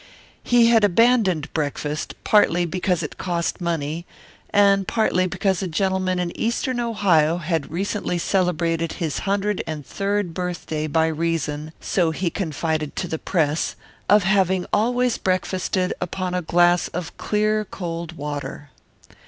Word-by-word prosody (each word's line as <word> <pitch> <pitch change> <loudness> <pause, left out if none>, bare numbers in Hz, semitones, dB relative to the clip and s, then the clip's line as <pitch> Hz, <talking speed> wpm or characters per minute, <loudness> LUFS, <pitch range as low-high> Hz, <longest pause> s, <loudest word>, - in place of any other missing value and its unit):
He 240 -1 +5
had 225 -2 +5
abandoned 205 - +3
breakfast, 150 0 -3
partly 175 -5 +4
because 180 0 -1
it 150 - -7
cost 175 -1 -2
money 165 0 -2 0.4
and 200 -1 +4
partly 185 -5 +2
because 190 0 0
a 190 - -2
gentleman 185 +1 0
in 175 -1 -2
eastern 240 +2 -1
Ohio 185 -9 +2
had 165 -3 -2
recently 190 +2 -2
celebrated 170 -2 0
his 160 -4 -3
hundred 205 0 0
and 155 -3 -5
third 200 +3 -2
birthday 170 -3 -3
by 160 +2 +2
reason, 160 -2 -2
so 175 -4 +1
he 170 +2 -2
confided 160 -4 -2
to 180 - -2
the 160 -1 -3
press, 155 -4 0 0.3
of 205 -1 +6
having 190 -1 +2
always 245 +3 +2
breakfasted 185 0 0
upon 180 +1 -3
a 180 - 0
glass 175 +1 +3
of 175 -1 -6
clear 215 0 +1
cold 170 -4 -5
water. 145 -2 -6
180 Hz, 135 wpm, -22 LUFS, 160-195 Hz, 0.4 s, of